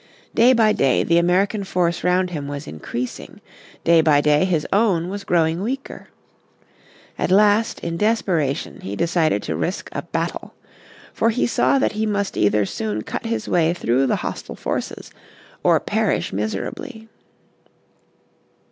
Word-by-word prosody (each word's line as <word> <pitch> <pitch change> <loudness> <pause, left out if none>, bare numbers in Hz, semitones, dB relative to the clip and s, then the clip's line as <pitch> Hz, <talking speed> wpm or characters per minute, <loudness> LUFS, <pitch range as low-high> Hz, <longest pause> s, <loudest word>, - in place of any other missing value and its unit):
Day 240 +3 +5
by 220 -3 +4
day 135 -2 +2
the 170 0 +3
American 195 +4 +1
force 175 -3 -1
round 180 0 +1
him 145 -4 -4
was 145 0 -6
increasing. 120 +11 -6 0.4
Day 165 -1 +5
by 155 -2 +4
day 150 +3 +3
his 170 -5 0
own 190 -5 +2
was 200 +1 -5
growing 165 -1 +1
weaker. 265 +6 -5 1.1
At - - 0
last 210 +3 +3
in 170 0 -3
desperation 180 -9 0
he 95 +2 -5
decided 165 - +1
to 80 - -3
risk 80 0 -3
a - - -4
battle. - - -4 0.6
For 230 - +2
he 230 +2 +1
saw 240 - +2
that 270 - +1
he 215 0 -2
must 200 -1 -1
either 105 0 +2
soon 105 +1 -3
cut - - -5
his 230 0 -3
way 170 0 +2
through 130 -3 +1
the - - +2
hostile - - -5
forces - - -4 0.5
or - - +4
perish - - -1
miserable. 105 - -3
170 Hz, 145 wpm, -21 LUFS, 145-205 Hz, 1.1 s, Day